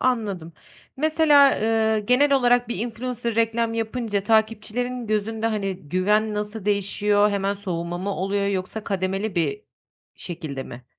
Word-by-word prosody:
Anladım. 205 -10 -1 0.4
Mesela, 300 -2 +5
ııı, 220 -1 +2
genel 280 +3 +4
olarak 245 -2 +3
bir 215 - -3
influencer 235 0 -3
reklam 230 0 +1
yapınca, 225 -2 -2
takipçilerin 225 +3 0
gözünde, 220 +1 -1
hani, 200 -4 -1
güven 210 +5 +1
nasıl 210 0 -4
değişiyor, 205 0 +2
hemen 200 0 0
soğuma 175 -3 -4
mı 195 +3 -3
oluyor 200 +2 -1
yoksa 200 +2 -3
kademeli 195 +1 -2
bir 415 - -1 0.5
şekilde 155 -6 -6
mi? 120 0 -11
215 Hz, 130 wpm, -23 LUFS, 195-235 Hz, 0.5 s, Mesela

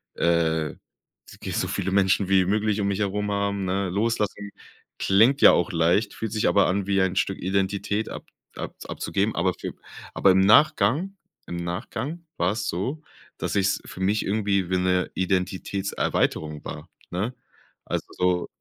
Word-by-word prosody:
äh, 80 -2 +1
wenn's - - -21
geht - - -4
so - - 0
viele 95 - -2
Menschen 95 0 +3
wie 95 -1 +4
möglich 105 +2 +1
mich 100 0 0
herum 105 0 -1
haben, 100 -1 -1
ne? 95 +1 -1
Loslassen 105 0 -1 0.5
klingt 115 +8 +4
ja - - +9
auch 90 - +1
leicht, 85 +5 +2
fühlt 110 -2 -4
sich 110 - +1
aber 100 - +4
an, 100 +1 -1
wie 100 -1 +2
ein 95 0 +1
Stück 95 0 0
Identität 100 +3 -1
ab - - -7 0.3
abz - - -7
abzugeben. - - -2
Aber - - +1
für - - -6 0.4
aber 95 - +5
im 95 - +4
Nachgang 150 - +4 0.3
im 85 - -5
Nachgang 125 - -5
war 90 +4 +1
es 105 -1 -3
so, 125 - -3 0.4
dass - - -3
ich's 100 0 +1
für - - -10
mich 100 +3 +1
irgendwie 100 -3 0
wie 95 - +1
'ne 90 0 +1
Identitätserweiterung 95 -4 -1
war, 75 - -7 0.2
ne? 100 +8 -2 0.5
Also - - -3
so 90 -1 0
100 Hz, 160 wpm, -25 LUFS, 90-105 Hz, 0.5 s, ja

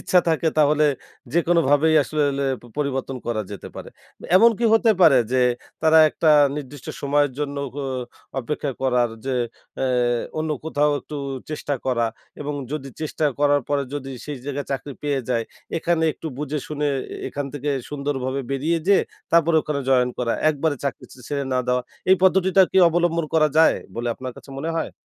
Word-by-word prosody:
ইচ্ছা 180 - +3
থাকে 160 0 +2
তাহলে 150 0 +4 0.5
যেকোনোভাবেই 160 -2 +3
আসলে 155 +1 -1 0.2
লে 140 - 0 0.3
পরিবর্তন 135 -2 -2
করা 115 -2 -1
যেতে 100 - -8
পারে। - - -8 0.5
এমন 230 +4 +7
কি 235 - -1
হতে 225 0 +4
পারে 150 -7 +7
যে 130 - +3 0.4
তারা 160 0 +6
একটা 160 - 0 0.3
নির্দিষ্ট 145 -2 -8
সময়ের 145 -1 +2
জন্য 145 -1 -3 0.2
গ - - -11 0.6
অপেক্ষা 140 +2 -3
করার 125 -2 +2 0.2
যে 135 - 0 0.5
এ - - +2 0.5
অন্য 155 0 -1
কোথাও 150 -2 +1
একটু 150 - -8 0.3
চেষ্টা 145 -1 -2
করা 120 -3 +1 0.3
এবং 145 0 -3 0.2
যদি 145 -3 -4
চেষ্টা 155 0 -1
করার 145 0 +3
পরে 145 -1 +1
যদি 135 -2 -5
সেই 150 -2 -5
জায়গায় 145 0 -4
চাকরি 135 +1 -4
পেয়ে 145 -2 0
যায় 115 -2 0 0.3
এখানে 165 0 0
একটু 165 - -9
বুঝে 150 0 -2
শুনে 150 -1 -2 0.3
এ - - -6 0.2
এখান 145 -1 -2
থেকে 145 +1 -2 0.2
সুন্দরভাবে 140 -2 -2
বেরিয়ে 150 +5 0
যেয়ে 200 - +5 0.3
তারপরে 165 -1 +4
ওখানে 145 -2 -2
জয়েন 125 -1 +3
করা। 120 -2 0 0.2
একবারে 150 0 -1
চাকরি 140 - -3
ছ - - -12
ছেড়ে 140 -2 -2
না 125 - +2
দেওয়া। 125 0 +1 0.3
এই 190 - +7
পদ্ধতিটা 190 0 +5
কি - - +4
অবলম্বন 170 0 +1
করা 155 -1 +5
যায় 160 - +6 0.2
বলে 120 +1 -2
আপনার 130 +1 -7
কাছে - - -13
মনে 160 +4 -2
হয়? 160 - -2
145 Hz, 170 wpm, -23 LUFS, 135-160 Hz, 0.6 s, এমন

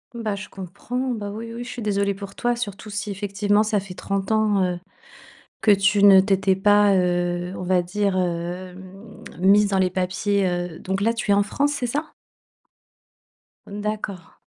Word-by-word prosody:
Bah 225 -3 -2
je 200 - -8
comprends, 210 +8 -5
bah 205 -3 -5
oui, 230 +3 -7
oui, 240 - -6
je 240 - -9
suis 240 - -6
désolée 200 -1 0
pour 195 0 -9
toi, 240 0 0
surtout 210 -2 -6
si 200 +1 -4
effectivement 205 +1 0
ça 215 -1 +1
fait 195 -1 -9
30 195 +2 -3
ans, 215 -3 +2
heu, 180 -1 -1 0.8
que - - +2
tu 200 0 +4
ne 195 -2 +9
t'étais 195 -1 +2
pas, 205 +1 +4
heu, 175 0 0
on - - -6
va 180 0 +1
dire, 195 +1 -1
hem, 185 +3 -5 0.2
mise 200 +3 +5
dans 195 - 0
les 185 -1 +2
papiers, 185 +2 0
heu 175 -2 -3
donc, 190 +1 -3
là, 225 +3 +2
tu 230 -2 -5
es - - +6
en 205 - +3
France, 285 +8 0
c'est 255 - -2
ça? 295 +6 -3 1.5
Mmh, 205 +1 -7
d'accord. 205 -5 -5
200 Hz, 180 wpm, -23 LUFS, 185-210 Hz, 1.5 s, ne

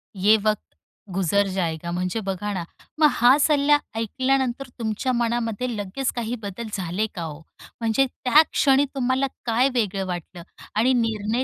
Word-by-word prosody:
"ये 200 +3 +5
वक्त 215 -1 -1 0.4
गुजर 195 +2 +2
जायगा" 170 -3 -2
म्हणजे 180 +4 -2
बघा 205 +2 -3
ना, 180 -3 -3 0.4
मग 305 - +7
हा 245 +3 +5
सल्ला 295 0 +4 0.2
ऐकल्यानंतर 260 +3 0
तुमच्या 225 +3 -1
मनामध्ये 235 0 -1
लगेच 210 +6 -2
काही 240 0 -2
बदल 205 +3 -6
झाले 190 +2 -1
का 175 - -4
हो? 150 -2 -6 0.4
म्हणजे 230 +3 +2
त्या 260 +4 +4
क्षणी 275 0 +4
तुम्हाला 260 +1 +1 0.2
काय 245 +3 +3
वेगळं 200 -5 0
वाटलं 175 -1 -6 0.3
आणि 235 +5 +3
निर्णय 225 0 0
225 Hz, 145 wpm, -23 LUFS, 195-255 Hz, 0.4 s, मग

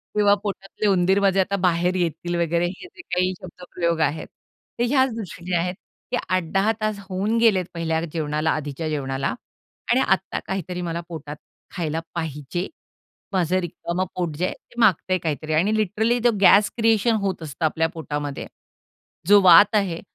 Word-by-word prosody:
किंवा 205 -1 +5
पोटातले 200 +1 -3
उंदीर 190 0 +3
माझे 195 -1 +2
आता 195 +1 +1
बाहेर 175 +1 +2
येतील 175 0 -2
वगैरे 170 0 +1
हे 195 - -8
जे 350 - -10
काही 180 - 0
शब्दप्रयोग 170 -2 -3
आहेत, 155 +2 -5 0.5
ते - - +2
ह्याच 265 -3 +3
दृष्टीनी 180 -4 -6
आहेत, 180 +2 0 0.4
ते - - +1
8-10 185 +4 +1
तास 215 -2 -1
होऊन 200 +5 0
गेलेत 205 -6 +3
पहिल्या 160 -1 -1
जेवणाला, 155 -1 0
आधीच्या 150 +1 -3
जेवणाला 135 -4 -2 0.6
आणि - - +4
आत्ता - - 0
काहीतरी 180 -1 -4
मला 170 0 -3
पोटात 150 -2 -7 0.4
खायला 160 -3 -2 0.2
पाहिजे. 160 +2 -4 0.7
माझं 185 0 +1
रिकामं 175 +1 -3
पोट 170 -5 -2
जे 180 - 0
आहे, - - -2
ते 240 - -14
मागतंय 185 -2 +3
काहीतरी 155 -1 -3
आणि 190 +8 +2
लिटरली 220 +4 +1
तो 240 - +5
गॅस 205 +2 +6
क्रिएशन 225 0 +3
होत 190 -4 -2
असतं 155 +2 -3
आपल्या 160 +1 +1
पोटामध्ये. 145 -3 -5 0.8
जो 205 +1 +7
वात 190 +4 +7
आहे, 190 -5 +1
180 Hz, 160 wpm, -23 LUFS, 160-200 Hz, 0.8 s, जो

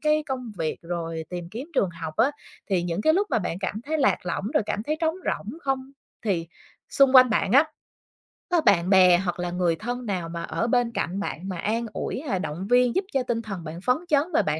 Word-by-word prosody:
cái 305 0 +2
công 255 -4 -4
việc 160 -1 -1
rồi 165 -1 -4
tìm 175 -1 -5
kiếm 245 +8 -6
trường 190 - +2
học 165 -2 -7
á 265 +5 +4 0.4
thì 180 -2 +2
những 175 +1 -2
cái 315 - +5
lúc 400 +4 +2
mà - - +3
bạn 180 -3 -3
cảm 205 +2 -3
thấy 310 +2 -1
lạc 265 - +3
lõng 185 - -2
rồi - - +4
cảm 210 - -2
thấy 305 +5 -1
trống 320 -1 +1
rỗng 225 +11 -3
không 270 -1 -2 0.3
thì 170 -5 0 0.4
xung 275 -1 +4
quanh 255 -2 +8
bạn 205 -1 +1
á 280 +4 +7 0.9
có 345 -2 +4
bạn 175 - +3
bè 185 -2 +7
hoặc 180 -1 -2
là 175 0 -2
người 175 -2 +1
thân 245 +6 -5
nào 180 -5 -2
mà 170 0 -5
ở 230 - -2
bên 245 -1 +2
cạnh 195 -3 -2
bạn 190 -1 -4
mà 180 - -4
an 225 +6 -1
ủi 260 - -3
hay 240 -11 -2
động 180 +2 -4
viên 245 -1 +4
giúp 380 - +1
cho 270 -2 +2
tinh 235 -2 -1
thần 195 -6 -6
bạn 165 +2 -7
phấn 250 +2 +3
chấn 290 -2 +4
và 320 - +4
bạn 150 +1 -1
205 Hz, 240 wpm, -25 LUFS, 175-260 Hz, 0.9 s, quanh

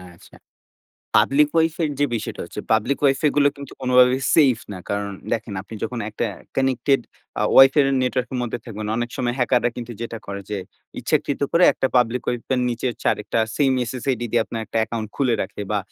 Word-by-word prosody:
আচ্ছা। - - -18 0.8
Public 150 +2 +4
Wi-Fi 165 +1 +1
এর 150 - -1
যে 145 - +3
বিষয়টা 110 - -5
হচ্ছে - - -7
পাবলিক 110 +6 +1
Wi-Fi 140 +2 +3
গুলো 145 -1 +5
কিন্তু 140 0 -10
কোনোভাবেই 125 +1 +4
সেইফ 135 -8 +5
না। 95 - -6
কারণ 100 0 -2 0.2
দেখেন 110 -2 -2
আপনি 100 - -11
যখন 125 - -3
একটা 105 - -2 0.3
কানেক্টেড 135 0 +2 0.4
আ - - +2
Wi-Fi 135 +3 +8
এর - - +2 0.2
নেটওয়ার্ক 125 -1 -1
এর - - -1
মধ্যে 120 0 -3
থাকবেন 110 -3 -6
অনেক 120 0 -2
সময় 120 -1 -1
হ্যাকাররা 125 -1 +2
কিন্তু 120 -1 -6
যেটা 115 -1 -5
করে 100 0 -5
যে 105 - -2 0.4
ইচ্ছাকৃত 140 - 0
করে 175 +1 +5
একটা - - 0
পাবলিক 125 +1 +2
Wi-Fi 120 +2 -2
এর - - +1
নিচে 120 +2 -3
হচ্ছে - - -9
আরেকটা - - -3 0.2
সেইম 140 -3 +3 0.2
SSID 130 -1 -2
দিয়ে 120 0 +3
আপনার 115 - -5
একটা 110 - -7
অ্যাকাউন্ট 110 -1 -2
খুলে 130 -4 +2
রাখে, 100 +2 -6
বা 105 - +2
125 Hz, 195 wpm, -22 LUFS, 115-135 Hz, 0.8 s, Wi-Fi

